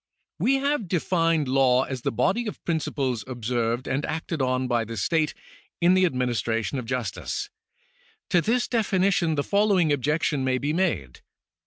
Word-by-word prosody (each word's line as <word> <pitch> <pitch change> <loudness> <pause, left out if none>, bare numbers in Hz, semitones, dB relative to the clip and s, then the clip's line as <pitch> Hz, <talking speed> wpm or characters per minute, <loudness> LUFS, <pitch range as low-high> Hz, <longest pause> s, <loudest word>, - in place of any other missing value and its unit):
We 270 - +3
have 275 -5 0
defined 165 -3 +1
law 130 -1 +3
as 130 -2 -5
the - - -1
body 190 - +1
of 210 - -7
principles 140 -7 -1
observed 120 0 -2
and 135 +3 -1
acted 160 -1 -3
on 130 0 0
by 120 -2 +1
the 115 0 -7
state 155 - 0 0.4
in 175 +1 +4
the 185 0 +4
administration 120 - -1
of 120 - -7
justice. 125 - -3 0.8
To 175 -3 +4
this 240 +6 +1
definition 195 -7 +1
the 145 - 0
following 200 -6 +3
objection 145 0 0
may 130 -1 +1
be 145 +4 -1
made. 160 - -1
145 Hz, 155 wpm, -25 LUFS, 125-180 Hz, 0.8 s, in